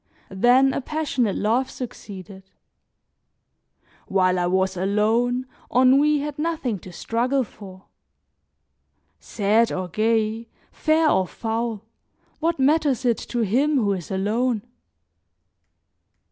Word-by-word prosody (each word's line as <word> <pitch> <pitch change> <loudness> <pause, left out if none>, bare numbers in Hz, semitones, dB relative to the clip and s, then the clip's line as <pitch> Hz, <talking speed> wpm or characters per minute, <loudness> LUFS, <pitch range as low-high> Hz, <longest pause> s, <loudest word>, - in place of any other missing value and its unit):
Then 250 +7 +4
a - - -2
passionate 270 -8 -1
love 235 +5 0
succeeded; 190 -5 -9 1.6
while 185 -1 +2
I 175 - +1
was 190 +1 +1
alone, 220 +6 +1 0.3
ennui 275 +4 +4
had 295 0 -5
nothing 305 - -2
to 185 - -12
struggle 250 +8 -1
for. 190 -4 -13 1.3
Sad 220 +2 +1
or 185 -1 -3
gay, 220 +3 0 0.2
fair 315 +1 +2
or 190 -10 +2
foul, 225 0 -3 0.6
what 335 +1 0
matters 280 -2 +2
it 235 -2 +2
to 240 - -3
him 265 +9 +1
who 210 -7 +2
is 180 -4 -6
alone? 215 +4 0
230 Hz, 105 wpm, -23 LUFS, 195-265 Hz, 1.6 s, Then